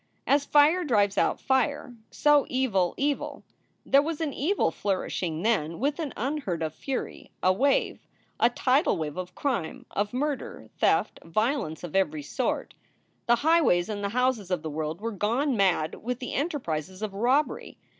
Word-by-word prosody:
As 280 +1 +3
fire 300 +6 +4
drives 205 - +2
out - - +1
fire, 265 0 0 0.2
so 295 -1 +3
evil 215 -9 +1
evil. 285 0 -2 0.4
There 275 - +5
was 315 +1 -3
an 310 -4 -2
evil 325 - +1
flourishing 180 -3 -2
then 170 -8 +1
with 285 +5 0
an 305 -5 -3
unheard 245 - -2
of 155 -1 -3
fury 265 - -5
a 185 - +5
wave, 275 +7 +1 0.3
a 235 - +5
tidal 255 - +2
wave 150 -2 -4
of 185 0 -6
crime, 235 - -2
of 205 +1 -1
murder, 280 +2 -3
theft, - - +2
violence 215 - -1
of 175 -1 -7
every 155 -6 +1
sort. 245 - -2 0.5
The 240 - +6
highways 315 - +4
and 205 -1 -4
the 200 - 0
houses 250 -4 0
of 180 -4 -1
the 160 - -4
world 155 +3 -4
were 230 +1 -2
gone 240 +7 0
mad 185 -6 +2
with 250 +1 -3
the 250 - -6
enterprises 190 - -3
of 210 -2 -3
robbery. 250 +9 0
230 Hz, 165 wpm, -27 LUFS, 180-280 Hz, 0.5 s, The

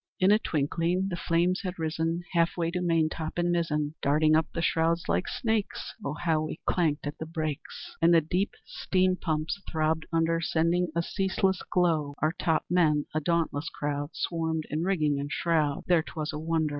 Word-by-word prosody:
"In 185 +2 +5
a 210 - +5
twinkling 170 +3 0
the 180 - -2
flames 170 +2 +1
had 185 -1 -4
risen 165 +1 -1
Half 170 0 +2
way 165 -1 0
to 180 - -2
maintop 160 -2 0
and 175 0 +1
mizzen, 150 -3 0
Darting 155 +2 +3
up 160 0 +2
the - - -4
shrouds 165 +1 +1
like - - 0
snakes! 225 -4 -2
Ah, 140 - -2
how 160 0 0
we 155 +1 -4
clanked 155 -5 +1
at 145 +1 -5
the 160 - -5
brakes! 155 -3 -5
And 165 +1 +5
the 170 - +7
deep 180 +6 -1
steam 185 -1 +1
pumps 160 +2 -2
throbbed 160 0 0
under 165 0 +1
Sending 170 +2 +1
a 170 - +1
ceaseless 190 0 0
glow. 160 -5 +1
Our 155 - +2
top 160 -2 +1
men 155 -4 +3
a 155 - +1
dauntless 165 -1 0
crowd 145 +1 -4
Swarmed 160 -2 -1
in 155 +2 -1
rigging 155 -7 +1
and 145 +1 -4
shroud; 155 -4 +1
There 175 -3 +4
('twas 155 -1 -5
a 150 - -4
wonder!) 160 -1 0
165 Hz, 185 wpm, -28 LUFS, 155-175 Hz, -, the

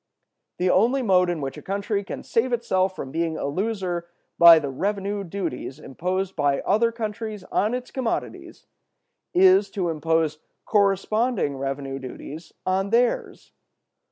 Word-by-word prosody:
The 180 0 +2
only 245 +7 +3
mode 180 -4 +3
in 170 -3 -2
which 135 -1 -4
a - - -8
country 200 +1 -2
can - - -7
save 245 +3 0
itself 190 -5 +1
from 135 - -6
being 165 0 -1
a - - -3
loser 180 +1 -2 0.3
by 170 -1 +10
the 145 -3 -2
revenue 200 +6 -2
duties 170 -8 -5
imposed 185 +6 -3
by 145 -2 +1
other 230 +3 +2
countries 215 -2 -5
on 215 +5 +1
its 250 0 -6
commodities 255 -4 -4 0.7
is, 190 +2 +6
to 190 -3 -2
impose 160 -1 0 0.3
corresponding 205 - +1
revenue 135 0 -4
duties 145 +4 -9
on 190 +1 0
theirs. 240 +2 0
185 Hz, 140 wpm, -24 LUFS, 160-210 Hz, 0.7 s, by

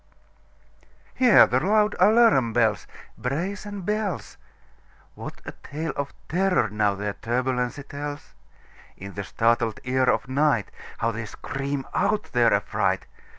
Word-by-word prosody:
Hear 250 -5 +7
the 125 - +1
loud 210 +6 +2
alarum 215 - +5
bells, - - +1 0.3
Brazen 195 +9 -3
bells! 210 -3 -3 0.8
What - - -9
a - - -5
tale 150 0 -6
of 140 -1 -3 0.2
terror, 180 - +1
now, 105 -1 +1
their 100 +1 -3
turbulency 125 +3 -2
tells! 145 +1 -7 0.6
In 100 +1 -9
the 100 - -4
startled 115 +1 +1
ear 130 +1 +1
of - - +2
nightHow 130 -4 -1
they 115 +1 -5
scream 135 +4 -4
out 205 +2 0
their 120 -2 +4
affright! 100 0 0
135 Hz, 120 wpm, -25 LUFS, 115-185 Hz, 0.8 s, Hear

